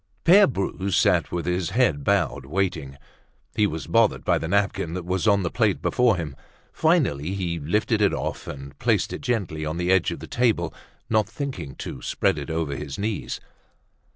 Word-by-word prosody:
Pere 195 +5 +7
Bru 100 -4 -2
sat 95 - +2
with 85 -1 -2
his 90 -1 -1
head 115 - +2
bowed, 70 0 0
waiting. 80 -5 -2 0.6
He 105 - +3
was 80 -6 -5
bothered - - +2
by - - +3
the 80 - -4
napkin 100 -3 0
that 90 -2 -5
was 95 +3 -1
on 100 -2 +4
the 85 - -2
plate - - +1
before 125 -4 +2
him. 75 -5 -5 0.4
Finally 110 - +1
he 85 -4 -2
lifted 105 +8 0
it 100 - +4
off - - -4
and 70 0 -8
placed 110 -6 +1
it - - -5
gently 100 - -2
on 80 +2 -3
the 90 +1 +1
edge 95 -2 +3
of - - -4
the - - -8
table, 110 -9 +1 0.3
not 110 -2 +1
thinking 130 - -5
to 65 - -7
spread - - 0
it - - -7
over 80 -3 -2
his 70 -1 -6
knees. 105 +1 -3
90 Hz, 185 wpm, -24 LUFS, 80-110 Hz, 0.6 s, Pere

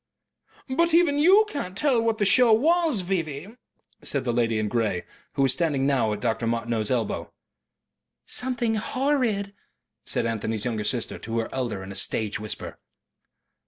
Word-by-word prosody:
"But 330 +5 +2
even 325 -4 +4
you 385 +8 +6
can't 200 - -5
tell 260 -2 +3
what 225 -1 0
the 205 - +1
show 245 +3 +6
was, 310 - +3
V.V." 170 -3 -3 0.5
said 140 - -1
the 120 -2 -1
lady 115 -2 +1
in 110 0 0
grey, 105 -5 -1 0.3
who 135 - +1
was 135 -1 +4
standing 150 -6 0
now 130 -6 +2
at 105 -1 -4
Dr. 115 -1 -1
Martineau's 115 -2 -1
elbow. 120 -4 -2 0.9
"Something 245 -3 -1
horrid," 235 -5 0 0.5
said - - 0
Anthony's 110 -1 -2
younger 110 -4 -2
sister 120 -3 -2
to 115 +1 -4
her 115 - -1
elder 120 -7 -3
in 95 - -8
a - - -8
stage 110 +1 -1
whisper. 110 0 -6
140 Hz, 160 wpm, -25 LUFS, -, 0.9 s, you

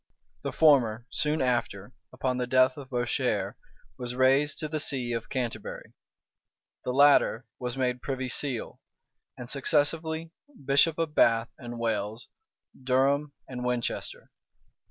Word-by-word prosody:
The - - -3
former, 120 -8 +4
soon 150 -1 0
after, 120 -3 -1 0.2
upon 130 0 -2
the 125 -1 -1
death 130 +1 +4
of 140 -3 -10
Bourchier, 120 -2 -1 0.5
was 125 0 -4
raised 135 +3 +3
to 155 - -3
the 155 0 -3
see 125 -4 -1
of 115 0 -4
Canterbury. 125 -3 -4 0.9
The - - -2
latter 140 -3 +4
was 125 0 -4
made 125 -1 0
privy 130 -1 -3
seal; 130 -1 -3 0.6
and 125 -2 -7
successively 160 +4 0 0.3
bishop 140 +4 +4
of 165 -2 -1
Bath 115 -4 +3
and 120 -1 -7
Wells, 110 -1 -2 0.5
Durham, 140 +3 +2
and 125 -1 -6
Winchester. 125 -1 -3
130 Hz, 130 wpm, -28 LUFS, 120-145 Hz, 0.9 s, former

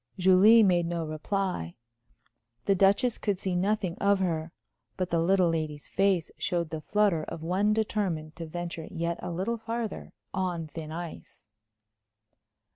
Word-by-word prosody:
Julie 190 +5 +7
made 175 -3 +3
no 170 -1 -2
reply. 155 - -2 0.9
The 200 - +4
Duchess 200 +5 +3
could 205 -3 0
see 190 -2 -2
nothing 195 -1 0
of 200 0 +3
her. 165 -3 -1 0.5
But 185 -1 -2
the 170 - +2
little 180 +1 +3
lady's 155 -3 -3
face 195 -4 +1
showed 170 -4 -1
the 160 -1 -4
flutter 205 -4 +2
of 160 - -7
one 190 +5 +1
determined 195 -8 -1
to 165 - -6
venture 170 0 -5
yet 170 +1 -2
a 180 - -4
little 190 +7 -2
farther 230 -1 -5 0.2
on 180 -3 -1
thin 155 0 -8
ice. 170 0 -8
180 Hz, 145 wpm, -28 LUFS, 165-200 Hz, 0.9 s, Julie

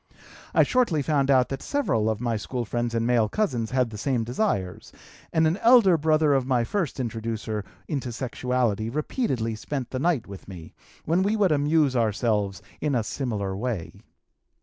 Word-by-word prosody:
I - - +7
shortly 210 - +1
found 140 -2 +1
out 130 -2 +4
that 135 - -4
several 115 - 0
of 110 -1 -1
my 120 -1 -1
school 120 +3 -3
friends 120 +1 -2
and 115 0 0
male 115 -3 +2
cousins 120 - -1
had 125 -3 +1
the 105 - -7
same 125 -1 0
desires, 115 - -2 0.4
and 160 -1 +3
an 160 +4 +2
elder 225 -6 +6
brother 155 -1 +3
of 135 -2 +1
my 125 -3 +2
first 165 - -2
introducer 110 -3 -3 0.2
into 135 -4 -3
sexuality 120 -3 -1
repeatedly 135 - -1
spent 125 +3 -5
the 130 - -2
night 150 -6 +1
with 100 -2 -11
me, 90 -4 -10 0.3
when 170 +4 +2
we 205 +3 +1
would 200 -5 +3
amuse 145 -1 +2
ourselves 105 -3 0 0.2
in 150 -3 0
a 115 - +1
similar 105 -5 -3
way. 105 -5 -3
125 Hz, 170 wpm, -25 LUFS, 110-150 Hz, 0.4 s, I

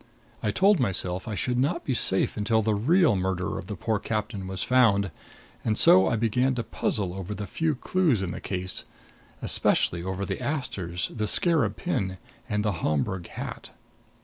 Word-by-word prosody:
I 105 - 0
told 195 - +3
myself 95 -5 -1
I 110 - -3
should 125 +5 -1
not 170 +6 0
be 135 - 0
safe 95 -5 +2
until 110 +1 +1
the 110 0 +1
real 150 - +3
murderer 95 -1 -2
of - - -9
the - - -5
poor 110 -2 -1
captain 105 -2 -3
was 95 -1 -3
found; 105 -7 +3 0.5
and 110 -1 0
so 95 0 +7
I - - +1
began 125 +4 +1
to 120 - -2
puzzle 100 -4 -2
over 95 +2 -5
the 105 - -5
few 155 - -1
clues 150 - +1
in 90 - -3
the - - -7
case 95 -1 -2 0.6
especially 85 - +3
over 95 +2 -3
the - - -4
asters, 110 - -3
the 110 -2 -2
scarab 155 - +3
pin 95 -1 -2 0.3
and 105 -1 -1
the 105 - +2
Homburg 85 +4 -1
hat. - - -7
105 Hz, 175 wpm, -26 LUFS, 95-125 Hz, 0.6 s, so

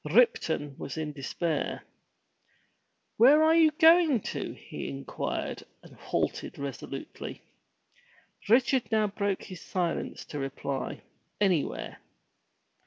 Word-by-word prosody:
Ripton 155 - +2
was 140 - -6
in 155 -1 -3
despair 150 +3 -2 0.7
— - - -43
"Where 280 +7 +7
are 320 +1 +5
you 325 -1 +6
going 320 - +5
to?" - - -4
he - - -7
inquired 70 0 -4 0.2
and - - -15
halted - - -2
resolutely. 140 -3 -6 1.1
Richard 250 +2 +3
now 220 -1 +3
broke 200 -1 -2
his 185 -3 -9
silence 175 -3 -2
to 145 - -6
reply, 135 0 -4 0.4
"Anywhere." 170 - 0
185 Hz, 105 wpm, -29 LUFS, -, 1.1 s, Where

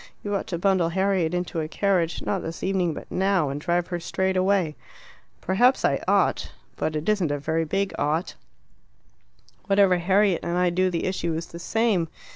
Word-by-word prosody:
You 205 - -3
ought 195 - -3
to 170 - -3
bundle 185 -2 +2
Harriet 190 -2 +1
into 180 -1 -2
a 155 - -3
carriage, 175 -2 0
not - - -1
this 165 +1 -6
evening, 185 -4 0
but - - -10
now, 190 -5 +1
and 140 +2 -4
drive 175 +1 0
her 175 -1 -2
straight 190 +2 -1
away." 185 -4 +1 0.7
"Perhaps 245 +8 +3
I - - +1
ought. - - +2 0.2
But 155 - -2
it 150 +1 -3
isn't 205 -7 +2
a 145 - -1
very 160 +3 -1
big 195 +4 -1
'ought.' 155 +4 0 1.3
Whatever 195 -3 +4
Harriet 190 +1 +3
and 170 +1 -2
I 180 -1 +2
do 185 +1 +2
the 170 -2 -2
issue 170 -3 -1
is 165 +1 -3
the 170 - -10
same. 215 -3 +1
180 Hz, 185 wpm, -25 LUFS, 165-195 Hz, 1.3 s, Whatever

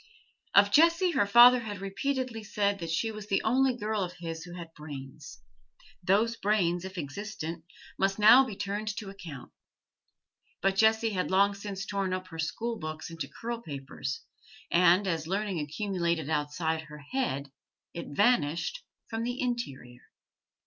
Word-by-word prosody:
Of 200 0 +7
Jessie 335 - +5
her 205 -11 +2
father 240 +4 +8
had 215 -3 -5
repeatedly 225 +4 -3
said 200 -1 0
that 165 -1 -5
she 220 +8 0
was 215 -1 -8
the 195 - +1
only 255 +2 +2
girl 215 -1 -1
of 180 -1 -3
his 165 -2 -6
who 175 0 -10
had 170 -2 -9
brains; 145 -2 -10 0.6
those 210 +6 +2
brains, 180 -4 +1
if 190 0 -8
existent, 165 0 -5 0.3
must 195 0 +1
now 220 +5 +8
be 235 -6 -6
turned 205 +2 -3
to 200 -3 -5
account. 170 -10 -10 1.1
But 195 0 +1
Jessie 220 +2 +3
had 185 -3 -1
long 200 +2 +4
since 195 -1 -6
torn 195 -2 -2
up 185 0 -4
her 165 -1 -9
school 225 +8 -2
books 155 0 -6
into 165 -4 -5
curl 230 +10 -5
papers, 140 - -5 0.5
and, 180 +3 +5
as 165 -3 -1
learning 195 -1 -1
accumulated 170 -1 -2
outside 160 +2 -1
her 150 0 -11
head, 140 - -2 0.4
it 170 - -6
vanished 185 - +1 0.2
from 225 0 -4
the 245 +2 -3
interior. 140 - -4
195 Hz, 155 wpm, -29 LUFS, 165-220 Hz, 1.1 s, father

